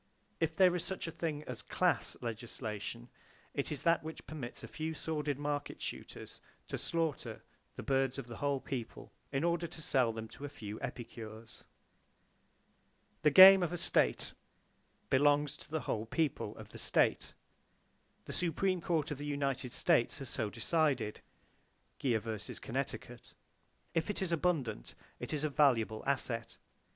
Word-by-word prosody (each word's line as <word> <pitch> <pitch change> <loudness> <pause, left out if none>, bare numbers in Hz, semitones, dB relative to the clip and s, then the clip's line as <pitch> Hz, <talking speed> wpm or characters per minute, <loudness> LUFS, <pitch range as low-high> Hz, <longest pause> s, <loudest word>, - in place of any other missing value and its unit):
If 160 -1 0
there 180 -1 +6
is 175 - -1
such 190 - -4
a 165 - -4
thing 155 -2 -3
as 125 -5 -5
"class" - - +1
legislation, 110 - -5 0.5
it 140 - -2
is 150 - -3
that 170 -1 +4
which 160 0 -7
permits 135 -6 -7
a - - -6
few 160 0 -4
sordid 150 -3 -2
market 145 0 -3
shooters - - -7 0.3
to - - -3
slaughter 165 -4 -2 0.3
the - - -6
birds 135 -1 +1
of 135 - -4
the 115 -1 -8
whole 140 -1 0
people 120 -5 -6 0.2
in 135 +2 0
order 170 0 +1
to 165 - -11
sell 130 -6 +2
them 110 0 -6
to 140 - -11
a 145 - -3
few 110 -6 -7
epicures. 115 -2 -7 1.6
The 150 - +6
game 190 +5 +11
of 175 - 0
a 175 - -2
state 60 - +2 0.8
belongs 145 +2 +4
to - - -15
the 155 0 -1
whole 110 0 -2
people 155 +3 -1
of - - -10
the - - -9
state. - - +2 0.9
The - - -6
Supreme 180 +2 +1
Court 160 -4 0
of 145 - -4
the 145 - -4
United 140 -3 -1
States 120 - +3
has 135 - -6
so 110 -2 -1
decided. 135 -8 0 0.8
(Geer 120 -5 +2
vs. 110 -2 -5
Connecticut). - - -5 0.6
If 165 +3 0
it 205 - -1
is 190 -3 -1
abundant, 160 - 0 0.2
it - - -5
is 150 -1 -1
a 155 - +2
valuable 120 -7 +3
asset. 120 -4 -1
145 Hz, 160 wpm, -34 LUFS, 120-160 Hz, 1.6 s, game